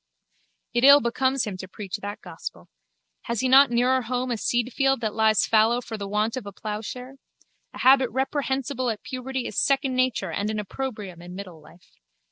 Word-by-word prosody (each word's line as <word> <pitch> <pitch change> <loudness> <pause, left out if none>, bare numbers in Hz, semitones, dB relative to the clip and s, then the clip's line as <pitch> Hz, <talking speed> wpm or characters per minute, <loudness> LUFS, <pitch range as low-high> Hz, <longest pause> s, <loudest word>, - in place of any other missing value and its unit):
It 240 - +1
ill 280 +1 +9
becomes 260 +1 0
him 200 -3 -5
to 190 - -8
preach 195 0 -6
that 205 0 -7
gospel. - - -9 0.6
Has 235 -3 -2
he 260 - +1
not 270 +1 +7
nearer 250 +2 +2
home 250 +2 -2
a - - +2
seedfield 245 +4 0
that 215 -2 -2
lies 220 0 +3
fallow 225 +2 +3
for 230 -2 -7
the 200 -2 -5
want 210 +3 0
of 255 - -4
the 200 - -7
ploughshare? 220 +6 -6 0.6
A - - -8
habit 260 -1 +5
reprehensible 265 0 -1
at 220 -2 -4
puberty 260 0 -4
is - - -2
second 275 -1 +1
nature 255 -1 0
and 205 +1 -2
an 215 - -2
opprobrium 210 -4 -5
in 180 +1 -10
middle 185 -5 -9
life. 175 +3 -19
240 Hz, 185 wpm, -25 LUFS, 210-260 Hz, 0.6 s, ill